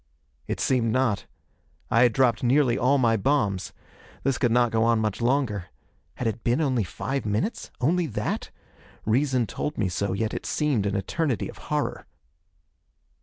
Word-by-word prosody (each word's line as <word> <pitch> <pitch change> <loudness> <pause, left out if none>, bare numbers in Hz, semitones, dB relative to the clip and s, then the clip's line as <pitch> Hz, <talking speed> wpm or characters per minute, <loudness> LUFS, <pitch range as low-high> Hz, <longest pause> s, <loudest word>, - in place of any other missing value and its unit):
It - - -3
seemed 120 -4 +2
not. 125 -5 +1 0.6
I 115 - +4
had 125 -1 +6
dropped 120 -2 +3
nearly 130 0 +3
all 130 +3 +3
my 115 -4 +3
bombs. 100 -6 0 0.5
This 135 - 0
could 120 -4 +2
not 120 0 +3
go 110 0 +2
on 115 0 +3
much 110 0 -1
longer. 120 -7 +1 0.5
Had 125 - -4
it 115 0 -3
been 120 +4 +2
only 130 -7 +1
five 135 +8 -3
minutes? 105 - -2
Only 170 +6 +2
that? - - -3 0.6
Reason 130 +2 +2
told 150 +6 -4
me 100 -4 +1
so, 100 +2 -1
yet 110 +3 -1
it - - -4
seemed 140 -10 +1
an 100 - -1
eternity 120 - -1
of - - -11
horror. - - -2
120 Hz, 165 wpm, -26 LUFS, 110-135 Hz, 0.6 s, had